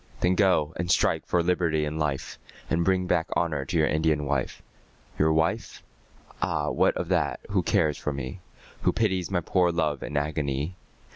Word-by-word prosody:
Then 90 +1 +3
go 90 -5 +2
and 85 +1 -3
strike 90 - +2
for 85 -1 +2
liberty 85 -3 +1
and 75 +1 -4
life, 75 -3 -2 0.3
And 85 +1 +2
bring 95 +1 +2
back 85 -1 +1
honour 75 -5 0
to 85 - -1
your 80 - +4
Indian 75 -1 +1
wife. 70 -3 -2 0.6
Your 80 +1 +4
wife? 80 +1 -1 0.6
Ah, - - 0
what - - +2
of - - -3
that, - - +1
who - - +2
cares 75 -2 +1
for 75 - -2
me? 70 -2 -5 0.4
Who - - +2
pities 95 -5 0
my 90 -3 0
poor 90 +1 +2
love 80 -4 -1
and 75 - -4
agony? 75 +2 -2
80 Hz, 175 wpm, -26 LUFS, 75-90 Hz, 0.6 s, your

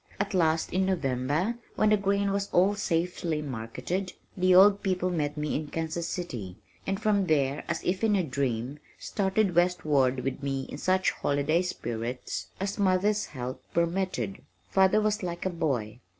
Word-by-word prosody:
At 200 +1 -1
last 165 -3 +1
in 190 +1 +2
November, 155 - 0 0.2
when 215 - +3
the - - +7
grain 200 0 +1
was 200 0 -1
all 190 +3 +4
safely 170 -4 -1
marketed, 145 - -4 0.2
the 185 -1 +4
old 200 +2 +7
people 185 -2 0
met 150 -3 -1
me 150 0 -2
in 150 0 -2
Kansas 165 +2 -3
City, 115 - -5 0.3
and 195 0 -1
from 205 -3 +2
there 140 -2 +1
as - - -2
if 185 +4 -1
in 215 -2 +4
a 190 - +2
dream, 135 -1 -2 0.2
started 195 -1 0
westward 155 -7 +2
with 135 +3 -3
me 135 -1 -2
in 145 - -7
such 185 +2 +2
holiday 145 +4 +1
spirits 120 -8 -4
as 195 +2 -3
mother's 200 +2 +2
health 130 -2 -6 0.2
permitted. 170 - -1 0.3
Father 190 +2 +4
was 215 0 0
like 175 -1 -4
a 185 - +1
boy. 125 -10 -2
175 Hz, 165 wpm, -28 LUFS, 140-190 Hz, 0.3 s, the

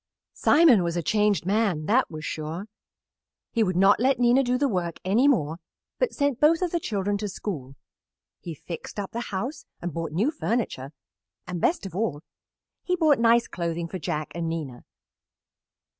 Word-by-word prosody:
Simon 295 - +5
was 170 0 -1
a 170 - -1
changed 210 0 +2
man, 195 -6 +1
that 245 +8 +2
was 155 -1 -7
sure. 160 +5 -4 0.9
He 230 - 0
would 185 -3 -1
not 195 +3 +5
let 260 +2 +3
Nina 245 +2 +4
do 250 -1 +1
the 285 +2 +2
work 180 -7 -2
any 220 +9 +3
more, 160 - +1 0.4
but - - +1
sent 285 -4 0
both 325 +4 +4
of 355 - -1
the 345 - 0
children 205 - -2
to 210 -1 -3
school. 140 -10 -6 0.6
He 170 -2 -7
fixed 170 +6 -8
up 200 - -4
the 235 - -4
house 245 +9 -4
and 175 -2 -5
bought 165 0 -4
new 205 - +1
furniture, 225 - -2 0.5
and, 180 -2 -5
best 330 - +1
of 185 -3 -7
all, 185 -8 -2 0.6
he 360 - 0
bought 310 -6 +3
nice 235 0 +4
clothing 170 -1 -3
for 185 +2 -6
Jack 155 -1 -3
and 170 -1 -3
Nina. 150 -7 -5
200 Hz, 175 wpm, -25 LUFS, 170-245 Hz, 0.9 s, Simon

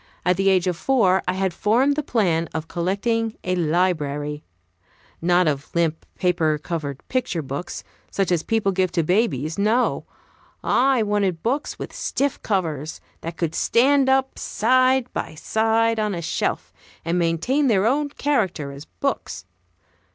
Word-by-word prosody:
At 180 0 +3
the 195 +1 +2
age 185 -2 +3
of 180 -2 0
four 190 -4 +2
I 180 - +1
had 190 -1 -1
formed 245 +10 +2
the 300 - 0
plan 180 - 0
of 160 0 -3
collecting 215 +7 -1
a 185 0 0
library. 150 -4 0 0.8
Not 175 +1 +3
of 140 -1 -1
limp, 165 -2 0
paper 170 -4 +1
covered 150 -3 -5
picture 215 -11 -1
books, 140 +6 -5 0.3
such 195 -2 -1
as 170 -3 +2
people 220 0 0
give 185 -1 0
to 170 -2 +2
babies; 160 - 0
no! 220 +5 +1 0.6
I 260 -2 +3
wanted 200 -5 0
books 270 +6 -1
with - - -7
stiff 280 0 -2
covers, 160 -7 -2 0.2
that 165 0 -6
could 165 -2 -1
stand 270 - +3
up 265 0 +1
side 255 +3 +2
by - - -4
side 225 +5 +1
on 210 -2 0
a 170 - -4
shelf, - - -2 0.3
and 170 +2 0
maintain 175 - +1
their 205 -4 +3
own 285 +5 +1
character 200 - -1
as 140 +2 -10
books. 275 - -4
185 Hz, 150 wpm, -23 LUFS, 165-230 Hz, 0.8 s, At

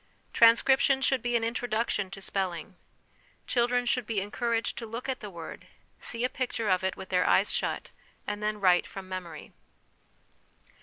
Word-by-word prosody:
Transcription 265 +4 +5
should 265 -1 +2
be 240 0 -1
an 230 - +2
introduction 230 -4 -1
to 195 +1 -9
spelling. 185 -2 -2 0.7
Children 245 0 +1
should 245 -2 0
be 225 -3 0
encouraged 230 +3 -1
to 230 - -6
look 230 +4 -6
at 260 -1 -2
the 210 - -7
word, 170 -3 -9 0.3
see 230 0 -3
a - - +4
picture 245 -4 -2
of 185 0 +2
it 190 - -1
with 190 - -9
their 180 -1 +2
eyes 200 - +4
shut, - - -2 0.3
and 210 0 -4
then 210 0 -1
write 180 -3 +4
from 195 -1 -8
memory. 175 -4 -7
215 Hz, 165 wpm, -29 LUFS, 190-240 Hz, 0.7 s, Transcription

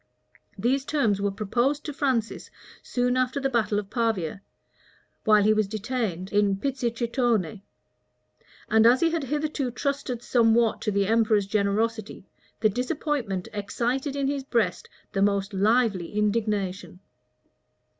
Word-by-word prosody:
These 265 +3 +1
terms 230 -10 0
were 200 - +1
proposed 240 +8 -1
to 295 - -4
Francis 260 -6 -1 0.3
soon 245 0 0
after 255 +2 0
the 270 -1 -1
battle 220 -4 +1
of 205 -1 -4
Pavia, 200 -7 -1 0.8
while 215 -1 +5
he 215 +1 +4
was 215 -2 +1
detained 210 -4 -3
in 205 -1 +3
Pizzichitone; 235 - -1 1.1
and 220 +1 +5
as 250 +2 +5
he 330 -1 +3
had 325 -4 -1
hitherto 295 -1 -2
trusted 255 -2 -3
somewhat 230 -1 +3
to 210 - -1
the 200 0 +1
emperor's 215 -1 +2
generosity, 215 +1 -1 0.3
the 220 - +5
disappointment 250 - -2
excited 245 +7 -2
in 280 -1 -1
his 280 -1 -2
breast 235 -4 -1 0.2
the 195 - -1
most 200 0 +1
lively 205 -2 +1
indignation. 205 -4 -1
225 Hz, 130 wpm, -26 LUFS, 205-255 Hz, 1.1 s, while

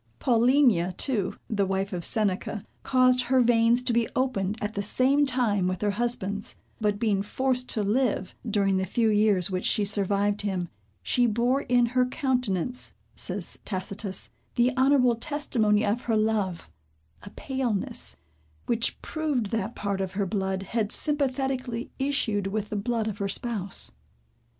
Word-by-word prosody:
Paulinia 235 -7 +3
too, 220 -9 -1
the 200 -3 0
wife 195 +1 -1
of 175 -1 -3
Seneca, 210 0 -1 0.2
caused 255 -1 +3
her 260 +2 +3
veins 235 0 +4
to 245 - +1
be 230 -1 +1
opened 220 -6 0
at 210 +1 -3
the 200 - -2
same 270 +7 +3
time 225 -8 +1
with 185 -1 -2
her 205 - +2
husband's, 205 -2 -2 0.2
but 210 -2 +1
being 205 -3 +1
forced 255 +4 -1
to 215 - 0
live, 210 -3 0 0.2
during 195 -2 +2
the 190 - 0
few 225 +4 +2
years 205 -3 +3
which 185 0 -2
she 210 - +2
survived 200 0 0
him, 185 -4 -2 0.3
"she 245 -1 +2
bore 240 +5 +1
in 245 -2 +3
her 250 +2 +2
countenance," 250 - -1 0.2
says - - -5
Tacitus, 190 0 -5 0.2
"the 245 +1 +2
honorable 260 -3 +4
testimony 230 -6 +1
of 210 +4 0
her 225 -2 +2
love, 215 -5 0 0.5
a 205 - -10
paleness, 250 -4 -2 0.5
which 230 -1 +1
proved 290 -10 -1
that 225 0 -2
part 200 -1 -2
of 190 -1 -3
her 200 0 0
blood 190 0 -2
had 215 +1 -1
sympathetically 265 -4 +1
issued 240 -8 0
with 210 +1 -3
the - - -4
blood 225 +2 -1
of 205 -2 -4
her 200 - -1
spouse." 200 -2 -3
220 Hz, 155 wpm, -27 LUFS, 200-250 Hz, 0.5 s, veins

